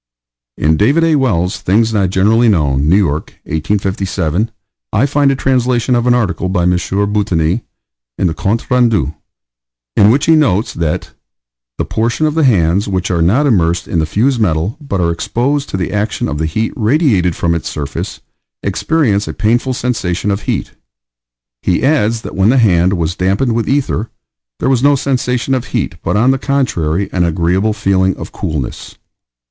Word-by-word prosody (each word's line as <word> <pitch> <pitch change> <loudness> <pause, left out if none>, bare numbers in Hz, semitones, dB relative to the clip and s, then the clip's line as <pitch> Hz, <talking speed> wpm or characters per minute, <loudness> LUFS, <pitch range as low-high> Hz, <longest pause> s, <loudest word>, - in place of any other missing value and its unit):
In 80 +1 +2
David 140 - +3
A. 165 -1 +3
Wells' 100 - 0
Things 110 +4 +1
not 100 -4 +1
Generally 110 +6 +3
Known, 75 -6 +1
New 90 - +5
York, 80 -7 -1
1857, 95 +2 -1 0.4
I - - +2
find 145 0 +2
a 135 - +1
translation 125 -2 +1
of 120 0 +1
an 125 - +4
article 95 -5 -1
by 90 -2 0
M. 90 - +3
Boutigny 95 -1 0 0.6
in - - 0
The 85 - +1
Comptes 110 +10 -2
Rendus, 115 - +2 0.8
in 100 0 +5
which 140 +6 +2
he 165 - +5
notes 115 -10 +1
that 80 -2 -2 0.7
"the - - -1
portion 115 +7 -1
of 155 - +1
the 160 -2 +2
hands 95 -5 +2
which 95 -2 -1
are 85 -2 0
not 110 - +3
immersed 85 - +1
in 85 - -1
the 80 - 0
fused 120 - +1
metal, 85 +2 0
but 140 -10 -3
are 85 -1 +1
exposed 135 +11 -1
to - - -3
the 95 - -3
action 105 +1 -1
of 75 -1 -4
the 80 - 0
heat 110 +8 -2
radiated 110 - +2
from 85 - 0
its 85 - -3
surface, 70 -2 -5 0.4
experience 105 - 0
a - - -4
painful 120 +5 0
sensation 105 -6 -1
of 100 +1 -2
heat." - - -3 0.9
He 90 - 0
adds 115 -6 +1
that - - -7
when 95 +2 +3
the 130 - +3
hand 95 -6 +3
was 85 -1 -1
dampened 100 +7 0
with 115 0 -1
ether 135 -5 0 0.5
"there - - -1
was 130 -2 +2
no 145 +1 +4
sensation 125 -1 -1
of 130 -2 -1
heat, - - -3
but, - - -1
on 125 +5 +4
the 135 - 0
contrary, 100 - 0
an 90 - +1
agreeable 90 +5 +1
feeling 95 -3 +1
of - - -8
coolness." 75 -5 -5
105 Hz, 175 wpm, -15 LUFS, 90-125 Hz, 0.9 s, New